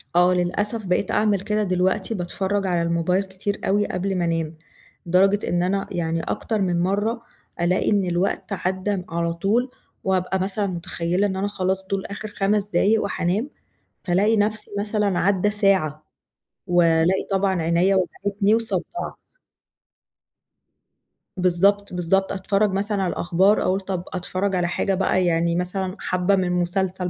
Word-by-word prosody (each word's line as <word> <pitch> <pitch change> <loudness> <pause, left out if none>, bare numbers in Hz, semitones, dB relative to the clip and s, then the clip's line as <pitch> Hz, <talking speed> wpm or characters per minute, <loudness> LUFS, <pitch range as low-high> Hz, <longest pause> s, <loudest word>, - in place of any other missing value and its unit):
آه، 180 +1 +5
للأسف 205 +5 -1
بقيت 180 +1 0
أعمل 210 -3 +2
كده 210 +1 0
دلوقتي 185 +3 0
باتفرّج 195 +1 -2
على 175 -2 +1
الموبايل 170 +3 +1
كتير 190 +1 -4
أوي 205 +2 +2
قبل 190 +1 -2
ما 175 - 0
أنام، 165 -1 -2 0.5
لدرجة 195 +4 +3
إن 175 0 +1
أنا 195 +2 0
يعني 165 -1 -1
أكتر 220 -3 -2
من 175 -2 +1
مرّة، 205 +5 0 0.4
ألاقي 180 +2 +2
إن 200 -2 +2
الوقت 180 +2 -1
عَدّى 190 +2 -1
م 180 -2 -5
على 170 0 -1
طول، 215 +9 0 0.3
وابقى 190 0 0
مثلًا 200 +2 -1
مُتخيّلة 175 +1 -1
إن 190 - -3
أنا 195 +2 -1
خلاص 190 -1 -2
دول 195 -1 -2
آخر 205 +2 -6
5 205 0 0
دقايق 215 +1 +2
وحانام، 200 +7 -1 0.5
فالاقي 200 +4 +2
نفْسِي 210 +1 -1
مثلًا 205 -2 0
عدّى 200 +1 +2
ساعة، 190 -8 +1 0.6
والاقي 175 0 +3
طبعًا 190 -2 +1
عينيَّا 170 +4 +2
وجعتني 200 +2 +1
وصدّعت. 220 -6 -1 2.5
بالضبط، 190 +3 +2
بالضبط 180 +2 +1
أتفرّج 195 +1 +1
مثلًا 200 +1 -1
على 180 - 0
الأخبار، 190 +5 +2
أقول 190 +2 +1
طَب 190 -2 -4
أتفرّج 185 +2 -2
على 175 -1 +1
حاجة 195 +2 0
بقى 185 -1 +1
يعني 170 0 +1
مثلًا 185 +1 -2
حبّة 180 +2 +1
من 190 - +1
المسلسل 180 +1 -1
190 Hz, 145 wpm, -23 LUFS, 180-200 Hz, 2.5 s, آه